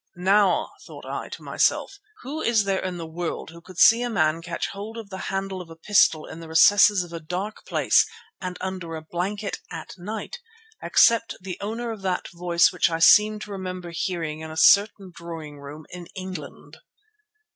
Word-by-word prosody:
Now 195 +2 +2 0.2
thought - - -11
I - - -5
to - - -9
myself, 395 - 0 0.2
who 295 +5 -5
is 225 -3 +3
there 195 -1 0
in 185 -1 -4
the 165 - -6
world 160 0 -5
who 170 +1 -13
could 185 0 -14
see 230 +6 +7
a 245 - -1
man 160 -6 +1
catch 170 0 -4
hold 210 +3 -8
of 215 -3 -9
the 190 - -6
handle 195 -1 -3
of 170 - -12
a 165 - -11
pistol 165 -3 +3
in 160 - -9
the 165 - -9
recesses 195 +4 +5
of 170 -1 -11
a 170 - -4
dark 180 +6 -5
place - - +3 0.3
and 180 -1 -5
under 185 -3 -5
a 160 - -7
blanket 195 +5 -3
at - - -7
night, 215 - -6 0.4
except 230 0 +4
the 185 -1 -7
owner 230 +3 -3
of 220 -3 -7
that 185 -2 -2
voice 175 0 +3
which - - +2
I 165 - -1
seemed 210 +5 +5
to 210 - -10
remember 185 -2 -6
hearing 165 -3 -3
in 160 0 -7
a 155 - -8
certain 200 0 +4
drawing 165 -4 -9
room 145 +2 -10
in 175 -1 -9
England? 185 -6 -8
185 Hz, 190 wpm, -24 LUFS, 165-205 Hz, 0.4 s, see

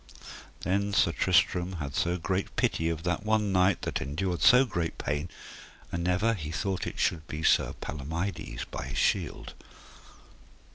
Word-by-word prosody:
Then 100 +2 0
Sir 85 - +4
Tristram 90 +4 +2
had 70 -5 -5
so 85 +5 0
great 95 +3 -2
pity 80 +1 +1
of 80 -1 -3
that 90 +1 -1
one 110 -1 +1
knight 95 0 +3
that - - -2
endured 85 +6 -2
so 125 0 +7
great 85 -8 -3
pain, 75 +5 -2 0.6
and 85 0 -2
ever 100 +6 +2
he 80 -8 -5
thought 95 +3 -2
it - - -6
should 80 -2 0
be 75 +1 -5
Sir - - +3
Palomides, 80 +7 -4
by - - -4
his - - -5
shield. - - 0
90 Hz, 155 wpm, -29 LUFS, 80-95 Hz, 0.6 s, so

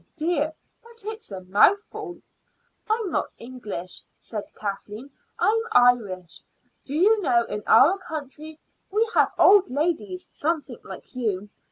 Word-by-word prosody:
"Oh, - - -39
dear, 315 -2 0 0.3
but 460 -2 -13
it's 435 - -6
a 190 -1 -6
mouthful." 360 - +1 0.7
"I'm 435 -4 0
not - - -2
English," 215 -8 -7 0.2
said 210 -3 -7
Kathleen; 210 +5 -6 0.3
"I'm 450 +2 +2
Irish. 200 - +3 0.4
Do 280 - -4
you 415 +6 +4
know, 240 -8 +3
in 210 - -4
our 365 +8 +6
country 310 -2 -7 0.3
we 435 +4 +2
have - - +4
old 395 -1 +6
ladies 345 +6 -2
something 315 0 -2
like - - -11
you. 210 -5 -2
300 Hz, 135 wpm, -25 LUFS, -, 0.7 s, our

